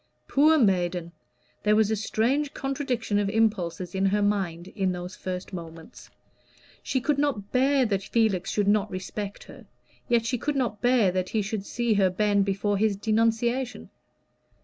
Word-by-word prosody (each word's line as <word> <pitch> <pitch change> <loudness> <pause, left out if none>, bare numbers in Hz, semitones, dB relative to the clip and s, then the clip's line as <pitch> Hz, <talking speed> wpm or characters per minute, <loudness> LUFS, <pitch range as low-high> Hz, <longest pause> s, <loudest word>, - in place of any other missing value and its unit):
Poor 305 +3 +4
maiden! 180 - +1 0.5
There 210 0 +3
was 220 0 +3
a - - +2
strange 245 +7 0
contradiction 260 -6 -1
of 200 -1 0
impulses 190 -5 0
in 190 0 +1
her 205 +1 +1
mind 190 -4 -1
in 190 -2 -1
those 180 +1 -6
first 185 +1 -6
moments. 165 +3 -10 0.7
She 260 - -1
could 280 +2 0
not 240 -9 -1
bear 265 +1 +3
that 200 -4 0
Felix 210 -3 0
should 205 -1 0
not 210 0 +2
respect 195 +2 -6
her, - - -14 0.4
yet 235 -2 +2
she 250 +1 -1
could 295 +4 -2
not 240 -6 -1
bear 245 -6 +3
that 185 0 -2
he 215 -2 0
should 205 -1 -4
see 240 -2 0
her 195 -2 +3
bend 200 +1 +1
before 200 +1 0
his 215 -1 +2
denunciation. 230 +4 0
210 Hz, 165 wpm, -26 LUFS, 190-240 Hz, 0.7 s, Poor